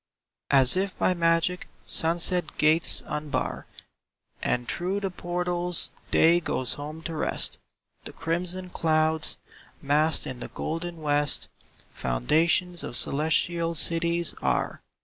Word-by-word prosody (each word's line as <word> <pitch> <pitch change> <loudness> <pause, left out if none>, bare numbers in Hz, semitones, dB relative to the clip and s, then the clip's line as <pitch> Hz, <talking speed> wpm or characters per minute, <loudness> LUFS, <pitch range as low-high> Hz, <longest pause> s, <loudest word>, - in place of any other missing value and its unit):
S 135 0 +7
if 190 0 -1
by 185 - +2
magic 170 +1 +1 0.2
sunset 170 0 +1
gates 155 +2 +4
unbar 150 -1 -3 0.7
And 120 -1 -1
through 185 - -2
the 195 -2 -3
portals 175 0 -2 0.2
Day 170 +2 +5
goes 130 -7 -1
home 155 +3 -7
to 165 - -4
rest; 155 - -2 0.5
The - - -7
crimson 180 +3 -3
clouds, 160 -1 +1 0.4
massed 150 +3 +2
in 130 -1 -6
the - - -6
golden 165 0 -5
west, 145 -1 0 0.4
Foundations 165 - +1
of 120 - -4
celestial 165 +3 0
cities 170 +1 +1
are. - - -1
165 Hz, 115 wpm, -26 LUFS, 155-175 Hz, 0.7 s, S